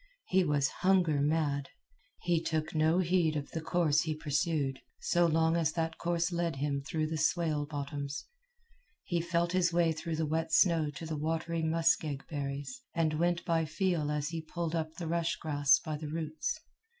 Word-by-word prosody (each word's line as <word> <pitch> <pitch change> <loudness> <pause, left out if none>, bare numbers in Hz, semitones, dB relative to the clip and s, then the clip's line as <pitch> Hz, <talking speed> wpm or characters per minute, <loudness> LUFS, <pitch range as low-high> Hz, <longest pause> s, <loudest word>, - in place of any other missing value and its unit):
He 190 0 +3
was 145 -4 +2
hunger 180 -6 +3
mad. 145 -2 0 0.5
He 175 -2 +1
took 155 -2 -2
no 160 +2 +3
heed 175 -3 +2
of 145 -1 -4
the 160 - -3
course 160 -2 +2
he 160 -2 -2
pursued, 145 -2 -1 0.2
so 175 0 +3
long 160 0 +3
as 160 -3 +1
that 165 -1 -2
course 170 0 0
led 170 -3 -1
him 140 0 -1
through 155 +2 -2
the 155 0 -3
swale 155 -3 +1
bottoms. 145 -1 -4 0.8
He 175 -2 -1
felt 170 0 0
his 180 -1 +2
way 170 -1 +3
through 160 +1 -3
the 160 0 0
wet 160 +1 -1
snow 165 -3 +4
to 145 +3 -7
the 160 -1 -3
watery 165 +2 -1
muskeg 160 -3 +1
berries, 145 - -4
and 155 -2 +1
went 175 0 +1
by 165 -1 +1
feel 155 -1 0
as 150 0 -1
he 165 -1 -4
pulled 165 +1 -4
up 160 -1 -2
the 170 - -5
rush 170 +1 0
grass 145 -3 +3
by 155 -2 -4
the 150 0 -6
roots. 165 - -3
160 Hz, 180 wpm, -31 LUFS, 150-170 Hz, 0.8 s, snow